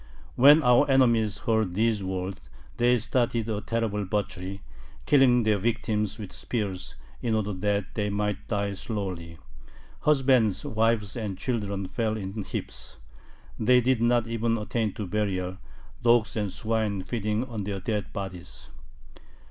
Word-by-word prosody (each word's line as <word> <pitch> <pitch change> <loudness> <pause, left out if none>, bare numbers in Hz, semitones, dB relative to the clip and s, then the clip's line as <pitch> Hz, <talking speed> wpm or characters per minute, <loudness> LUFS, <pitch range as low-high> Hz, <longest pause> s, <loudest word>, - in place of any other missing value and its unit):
When 145 +5 +7
our 125 +2 +5
enemies 115 -5 +3
heard 110 -5 0
these 110 -1 +1
words, 95 0 -4 0.3
they 120 +1 +4
started 115 -1 0
a 105 -2 -2
terrible 110 -1 -1
butchery, 100 -1 -3 0.4
killing 130 -4 +5
their 110 -2 +2
victims 110 -1 -1
with 105 -3 -8
spears 95 -6 -3 0.3
in 115 -2 0
order 105 -1 -1
that 100 +1 -1
they 105 -2 -1
might 105 0 -2
die 100 -2 -1
slowly. 95 -5 -5 0.6
Husbands, 130 -8 +3
wives, 110 -1 +1
and 105 -5 -4
children 100 -4 -2
fell 110 +2 -1
in 100 +1 -5
heaps. - - -6 0.6
They 125 +3 +5
did 125 -1 +1
not 120 -1 +3
even 115 0 0
attain 110 0 -1
to 105 - -5
burial, 95 -2 -2 0.4
dogs 120 -2 +3
and 105 -3 -1
swine 110 -3 -1
feeding 105 +3 -1
on 115 -5 -5
their 100 0 -3
dead 105 +1 -3
bodies. 95 -3 -8
105 Hz, 140 wpm, -27 LUFS, 100-115 Hz, 0.6 s, When